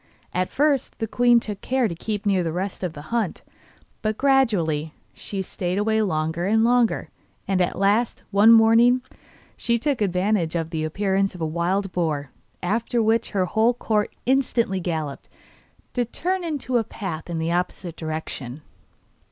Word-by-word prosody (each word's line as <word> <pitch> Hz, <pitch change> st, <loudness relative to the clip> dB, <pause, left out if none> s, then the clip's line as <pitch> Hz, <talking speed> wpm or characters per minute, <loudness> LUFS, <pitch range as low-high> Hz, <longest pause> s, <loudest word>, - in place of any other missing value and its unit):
At 185 Hz, 0 st, 0 dB
first 285 Hz, -2 st, +1 dB
the 225 Hz, -, -2 dB
queen 240 Hz, +2 st, +4 dB
took 210 Hz, -3 st, -6 dB
care 260 Hz, -2 st, +1 dB
to 180 Hz, -, -4 dB
keep 210 Hz, +4 st, -4 dB
near 195 Hz, -3 st, +3 dB
the 165 Hz, -, -2 dB
rest 185 Hz, +3 st, -4 dB
of 175 Hz, -3 st, -2 dB
the 145 Hz, -, -9 dB
hunt, 225 Hz, -6 st, -1 dB, 0.6 s
but 215 Hz, -1 st, -1 dB
gradually 190 Hz, -, +2 dB, 0.2 s
she 195 Hz, -2 st, -4 dB
stayed 180 Hz, 0 st, -3 dB
away 220 Hz, +1 st, +2 dB
longer 165 Hz, -2 st, -1 dB
and 220 Hz, +2 st, +3 dB
longer, 240 Hz, -1 st, +2 dB, 0.4 s
and 190 Hz, -1 st, +1 dB
at 180 Hz, -, 0 dB
last, 205 Hz, +4 st, +1 dB
one 205 Hz, +3 st, +6 dB
morning, 230 Hz, +2 st, +6 dB, 0.5 s
she 235 Hz, 0 st, 0 dB
took 270 Hz, 0 st, -1 dB
advantage 185 Hz, -3 st, +1 dB
of 165 Hz, -1 st, -2 dB
the 160 Hz, -2 st, -2 dB
appearance 195 Hz, +4 st, 0 dB
of 175 Hz, -, -9 dB
a -, -, +1 dB
wild 180 Hz, +5 st, -1 dB
boar, 155 Hz, -6 st, -2 dB, 0.3 s
after 225 Hz, +6 st, 0 dB
which 225 Hz, +1 st, +2 dB
her 190 Hz, -3 st, 0 dB
whole 220 Hz, +6 st, +2 dB
court 215 Hz, -3 st, 0 dB
instantly 240 Hz, -6 st, +1 dB
galloped, 160 Hz, -5 st, -4 dB, 0.6 s
to 245 Hz, -, +1 dB
turn 360 Hz, +10 st, -2 dB
into 280 Hz, -7 st, -1 dB
a -, -, 0 dB
path 180 Hz, -7 st, -6 dB
in 170 Hz, -, -3 dB
the 160 Hz, +1 st, -1 dB
opposite 175 Hz, -1 st, -2 dB
direction. 155 Hz, -4 st, -5 dB
200 Hz, 165 wpm, -23 LUFS, 170-230 Hz, 0.6 s, one